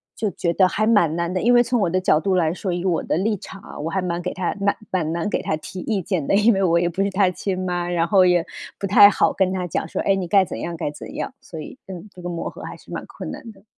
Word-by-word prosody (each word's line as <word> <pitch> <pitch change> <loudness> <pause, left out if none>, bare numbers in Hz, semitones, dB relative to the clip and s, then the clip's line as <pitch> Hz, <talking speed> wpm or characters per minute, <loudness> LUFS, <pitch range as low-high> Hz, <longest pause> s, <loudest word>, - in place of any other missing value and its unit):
就 215 -2 -1
觉 170 -1 -1
得 185 +1 +4
还 215 +3 0
蛮 175 -8 +3
难 170 +1 -2
的， 185 - -1
因 240 - +3
为 240 0 +6
从 245 -2 0
我 175 - +2
的 185 +2 +1
角 155 -4 +3
度 185 +3 0
来 165 -2 +2
说， 185 0 -3
以 175 +1 -3
我 175 -3 +1
的 - - -1
立 210 +3 +1
场 195 +2 -10
啊， - - -11
我 160 - -3
还 190 +2 -1
蛮 175 -1 -2
给 180 - -3
她 185 +1 -2
蛮 200 0 +1
蛮 165 -4 0
难 170 +3 -2
给 - - -1
她 155 - -1
提 185 +4 -8
意 215 -4 -1
见 170 -5 -2
的， - - +3
因 215 +2 +5
为 195 - 0
我 170 -1 +3
也 175 - +1
不 175 +3 -2
是 200 - 0
她 190 -1 +2
亲 185 +1 -3
妈， 175 -1 -2
然 170 -1 +1
后 195 -3 +5
也 175 -2 +3 0.3
不 200 - -2
太 205 +1 +8
好 - - +2
跟 190 -1 +1
她 185 -1 -2
讲 160 - -2
说， - - -4
哎， 195 - +3
你 185 -2 -3
该 195 +1 +4
怎 - - -6
样 170 -1 -4
该 145 - -2
怎 - - -10
样， 265 - -4
所 160 - -9
以， 205 - -9
嗯， 190 +2 -8
这 180 - -12
个 175 - -5
磨 170 -1 -4
合 - - -12
还 - - -8
是 - - -17
蛮 - - -4
困 - - -7
难 230 - -9
的。 195 -1 -20
185 Hz, 330 characters per minute, -22 LUFS, 170-200 Hz, 0.3 s, 太